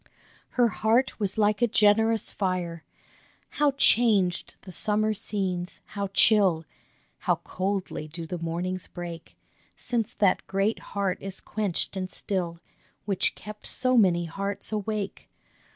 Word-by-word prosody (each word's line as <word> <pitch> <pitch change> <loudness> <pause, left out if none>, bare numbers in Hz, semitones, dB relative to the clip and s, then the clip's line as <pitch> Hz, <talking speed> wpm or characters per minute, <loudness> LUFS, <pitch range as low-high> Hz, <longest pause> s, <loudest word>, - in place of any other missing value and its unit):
Her 245 -1 +6
heart 230 +4 +1
was 200 -1 -1
like 210 +1 +2
a 240 - +5
generous 220 0 +3
fire! 180 -4 -2 0.7
How 295 -1 +2
changed 215 -9 +3
the 185 - -10
summer 215 +3 +2
scenes, 190 -4 -3
how 200 -1 -4
chill, 195 -4 +4 0.5
How - - +2
coldly 190 -4 -3
do 165 +2 -7
the 175 +2 -5
mornings 175 +2 -3
break, 170 -2 -8 0.4
Since 235 -3 -2
that 195 -3 +2
great 195 +3 0 0.2
heart 195 -2 0
is 195 -1 -5
quenched 205 -3 -2
and 185 0 -4
still, 175 -4 -3 0.5
Which 195 -2 +1
kept 210 0 -8
so 255 -1 +1
many 180 -6 +4
hearts 200 +6 -3
awake 210 -1 -3
195 Hz, 130 wpm, -27 LUFS, 180-215 Hz, 0.7 s, Her